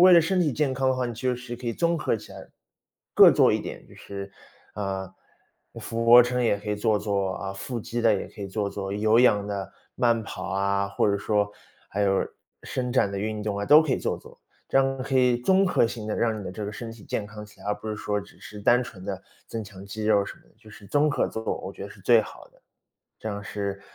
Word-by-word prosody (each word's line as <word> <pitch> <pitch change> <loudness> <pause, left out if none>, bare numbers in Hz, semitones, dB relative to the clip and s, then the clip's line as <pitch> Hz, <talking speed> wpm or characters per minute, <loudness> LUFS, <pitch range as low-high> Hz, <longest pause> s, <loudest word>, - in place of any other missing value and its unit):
为 185 +1 +8
了 170 - +9
身 180 +3 +1
体 155 -5 +2
健 135 0 0
康 130 0 +1
的 130 - 0
话， 125 -1 0
你 120 - -5
就 125 +1 -1
是 125 -1 -7
可 120 0 -5
以 - - -1
综 170 +4 +1
合 150 - 0
起 - - -12
来 - - -11 0.7
各 - - +9
做 - - +4
一 - - +1
点， - - -8
就 - - -17
是， 100 0 -8 0.4
嗯， 95 -2 -3 0.7
俯 115 0 -3
卧 120 +1 +9
撑 125 0 +1
也 105 -3 +2
可 105 +1 -9
以 105 - +1
做 105 0 +1
做 100 -2 -1
啊， 95 - -5
腹 115 +5 -5
肌 120 +2 -4
的 115 -2 +4
也 100 - -1
可 105 - -10
以 100 - -5
做 100 +1 -2
做， 100 -1 -5
有 110 +3 +3
氧 105 -5 +4
的 100 -2 -4 0.2
慢 120 -2 +2
跑 95 -3 -6
啊， 100 0 0
或 100 - +1
者 100 - +2
说， 105 0 +1 0.4
还 100 - -3
有 95 -1 +2 0.4
伸 125 -1 -3
展 100 -6 +3
的 - - -3
运 110 0 -3
动 105 -1 -2
啊， 100 - -2
都 150 +8 +8
可 155 -4 0
以 - - +1
做 - - -2
做。 - - -16 0.3
这 135 - +4
样 135 0 +1
可 135 0 +1
以 125 -1 +4
综 190 +10 +3
合 180 - +3
性 115 -1 -4
地 105 - -2
让 115 -2 +1
你 100 - -7
的 - - -5
这 105 +2 -5
个 100 - -4
身 115 +1 -7
体 115 -2 -14
健 105 - -3
康 105 0 -9
起 105 - -18
来， - - -12
而 105 - +1
不 105 +1 -8
是 105 - -3
说 105 0 -2
只 100 - -15
是 105 -1 -10
单 120 +4 +4
纯 95 -6 -11
地 95 -1 -4 0.3
增 115 -1 -4
强 100 -1 -11
肌 105 +2 -6
肉 105 -2 +4
什 - - -9
么 - - -22
的， - - -28
就 110 -1 -17
是 100 -1 -13
综 150 +4 +2
合 - - +1
做， 110 - -5 0.2
我 95 - -6
觉 - - -9
得 100 - -7
是 100 - -14
最 110 +3 +5
好 - - -11
的。 - - -27 0.5
这 110 - -6
样 100 -1 -4
是 100 -2 -4
110 Hz, 285 characters per minute, -26 LUFS, 100-125 Hz, 0.7 s, 了